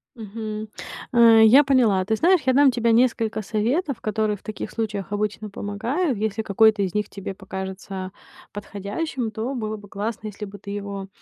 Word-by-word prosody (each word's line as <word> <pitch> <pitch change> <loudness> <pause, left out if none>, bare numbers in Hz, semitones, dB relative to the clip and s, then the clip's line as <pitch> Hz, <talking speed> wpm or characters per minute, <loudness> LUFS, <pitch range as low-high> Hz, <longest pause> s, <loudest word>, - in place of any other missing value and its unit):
Мгм, 215 -1 -6 0.5
э, 230 -2 +7
я 260 +7 +8
поняла. 240 -9 +3
Ты 220 +3 0
знаешь, 355 - +4
я 260 - +4
дам 280 +1 +6
тебе 235 -1 +1
несколько 225 -2 +2
советов, 240 - -1
которые 215 0 0
в 200 - -17
таких 215 - -6
случаях 210 -4 -3
обычно 210 +1 -2
помогают. 230 - -2
Если 220 +1 -1
какой-то 215 0 +3
из 190 -3 -1
них 210 -1 -1
тебе 195 -1 -6
покажется 190 0 -6 0.4
подходящим, 210 - -4
то 220 +5 -3
было 215 -3 -3
бы 205 -1 -13
классно, 215 +2 -4
если 210 0 -8
бы 205 0 -10
ты 200 +1 -9
его, 200 -1 -5
215 Hz, 170 wpm, -23 LUFS, 200-230 Hz, 0.5 s, я